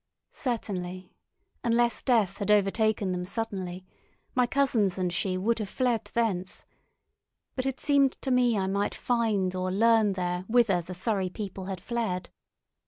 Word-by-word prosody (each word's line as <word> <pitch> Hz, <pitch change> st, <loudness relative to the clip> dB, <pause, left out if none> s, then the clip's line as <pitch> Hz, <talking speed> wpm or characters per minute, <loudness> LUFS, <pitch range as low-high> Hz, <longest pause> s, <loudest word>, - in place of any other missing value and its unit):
Certainly, 185 Hz, -, -4 dB, 0.5 s
unless 235 Hz, -1 st, +2 dB
death 220 Hz, -7 st, +2 dB
had 200 Hz, -, -3 dB
overtaken 210 Hz, 0 st, +2 dB
them 180 Hz, 0 st, -2 dB
suddenly, 185 Hz, -3 st, -4 dB, 0.5 s
my 250 Hz, -1 st, +3 dB
cousins 240 Hz, -9 st, +2 dB
and 180 Hz, -2 st, -1 dB
she 185 Hz, +1 st, 0 dB
would 225 Hz, +5 st, 0 dB
have 210 Hz, -3 st, -4 dB
fled 245 Hz, -2 st, 0 dB
thence; 195 Hz, -6 st, -1 dB, 0.9 s
but 255 Hz, 0 st, -1 dB
it 270 Hz, -, -3 dB
seemed 280 Hz, -2 st, +3 dB
to 265 Hz, -, -1 dB
me 245 Hz, -3 st, +3 dB
I 190 Hz, -, 0 dB
might 200 Hz, +2 st, -1 dB
find 220 Hz, -6 st, 0 dB
or 185 Hz, 0 st, -2 dB
learn 220 Hz, 0 st, +4 dB
there 180 Hz, -1 st, -2 dB
whither 220 Hz, -6 st, +3 dB
the 180 Hz, +2 st, -8 dB
Surrey 190 Hz, 0 st, -1 dB
people 190 Hz, -1 st, -6 dB
had 190 Hz, -1 st, -4 dB
fled. 215 Hz, -4 st, -3 dB
205 Hz, 150 wpm, -28 LUFS, 185-235 Hz, 0.9 s, learn